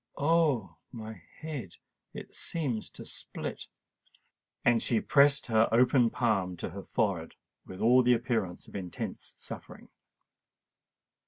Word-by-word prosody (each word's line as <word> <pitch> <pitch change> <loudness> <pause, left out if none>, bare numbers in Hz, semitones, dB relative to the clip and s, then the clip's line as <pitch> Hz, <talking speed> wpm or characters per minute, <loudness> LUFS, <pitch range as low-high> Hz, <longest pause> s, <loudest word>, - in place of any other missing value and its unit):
Oh! 145 - +2
my 110 -5 -8 0.2
head—it 145 - -9
seems 135 -10 -3
to - - -10
split!" - - -6 1.0
And 120 -1 +5
she 115 - +2
pressed 140 +2 +4
her 110 -1 +3
open 125 +1 +5
palm 100 -7 0
to - - -5
her 100 - -6
forehead 95 -7 -1 0.3
with 95 - -8
all 125 +3 +6
the 125 0 +5
appearance 115 -7 -2
of - - -13
intense 90 -4 -5 0.2
suffering. - - -9
115 Hz, 115 wpm, -30 LUFS, 100-130 Hz, 1.0 s, all